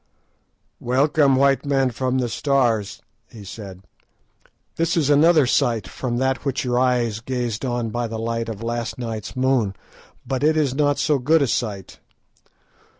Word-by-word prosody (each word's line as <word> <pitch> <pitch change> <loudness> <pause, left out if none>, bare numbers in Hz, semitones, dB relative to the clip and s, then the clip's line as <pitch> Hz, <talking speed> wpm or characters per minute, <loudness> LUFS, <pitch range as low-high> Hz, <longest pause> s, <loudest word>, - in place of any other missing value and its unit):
"Welcome, 135 +2 +2
white 135 +1 +3
men 135 -3 +1
from 130 +2 -1
the 125 -2 0
Stars," 115 -5 0 0.3
he 110 -4 -12
said; 95 -1 -9 0.9
"this 165 +1 0
is 145 -3 +2
another 155 0 +5
sight 120 -6 +1
from 120 +4 -4
that 130 0 0
which 135 -2 -2
your 125 0 +1
eyes 120 -4 +1
gazed 120 -2 -3
on 120 -3 -2
by 120 +1 -2
the 115 0 -5
light 115 0 -3
of 110 0 -6
last 120 0 -3
night's 115 -4 -5
moon, 130 -6 +1 0.5
but 130 +2 -2
it 155 +1 +3
is 145 -5 +1
not 145 0 +1
so 150 -3 +1
good 150 +4 +3
a - - 0
sight. 105 -4 -3
125 Hz, 155 wpm, -22 LUFS, 115-140 Hz, 0.9 s, another